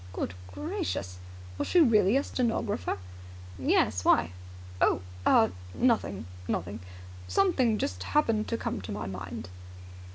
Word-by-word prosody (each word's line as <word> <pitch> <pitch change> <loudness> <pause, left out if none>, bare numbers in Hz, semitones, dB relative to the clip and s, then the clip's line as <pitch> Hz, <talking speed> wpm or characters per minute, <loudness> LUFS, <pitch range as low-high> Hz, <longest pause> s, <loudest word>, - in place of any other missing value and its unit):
"Good 90 - -3
gracious! 90 -1 -4 0.4
Was - - -1
she 360 - +4
really 225 - +5
a 280 - +1
stenographer?" 225 - -1 0.6
"Yes. 90 +1 +2
Why?" 85 - +4 0.5
"Oh - - +3 0.3
ah 110 - +6 0.3
nothing, 220 - +1 0.2
nothing. 100 +5 -2 0.5
Something 265 - +3
just 90 - -2
happened 225 - +1
to 230 - -1
come 105 - -3
to 95 - -7
my 105 +1 -4
mind." 95 -2 -6
110 Hz, 125 wpm, -29 LUFS, -, 0.6 s, ah